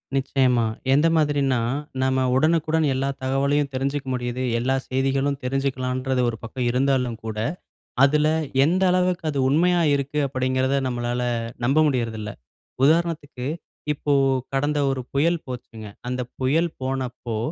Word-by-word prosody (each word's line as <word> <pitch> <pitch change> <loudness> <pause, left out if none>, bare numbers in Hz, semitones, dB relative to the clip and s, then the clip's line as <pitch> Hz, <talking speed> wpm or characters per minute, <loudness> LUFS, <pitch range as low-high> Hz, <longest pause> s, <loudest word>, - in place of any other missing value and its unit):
நிச்சயமா. 130 -3 +2 0.3
எந்த 150 +4 +4
மாதிரினா, 145 -4 +2 0.5
நம்ம 130 0 +2
உடனுக்குடன் 160 +1 +2
எல்லா 135 +1 -1
தகவலையும் 140 +2 +1
தெரிஞ்சுக்க 135 +1 -2
முடியுது, 125 0 -3 0.2
எல்லா 130 +3 +1
செய்திகளும் 135 +1 0
தெரிஞ்சுக்கலான்றது 130 -1 -1
ஒரு 115 - -5
பக்கம் 120 +2 -3
இருந்தாலும் 125 -2 +1
கூட, 110 -1 -5 0.7
"அதுல 150 +2 +3 0.4
எந்த 180 +5 +2
அளவுக்கு 180 -1 +1
அது 145 - -3
உண்மையா 175 +5 +3
இருக்கு", 140 +2 -1
அப்படிங்கிறத 130 +1 0
நம்மளால 120 0 -2 0.4
நம்ப 135 +5 +2
முடியுறதில்ல. 115 -5 -2 0.5
உதாரணத்துக்கு 155 -4 +1 0.5
இப்போ 145 0 -2 0.4
கடந்த 145 +2 +1
ஒரு 130 -1 -2
புயல் 165 +5 +2
போச்சுங்க, 115 -4 -8 0.2
அந்த 125 0 -2 0.2
புயல் 160 +6 +2
போனப்போ 130 -3 -3
135 Hz, 120 wpm, -23 LUFS, 125-145 Hz, 0.7 s, எந்த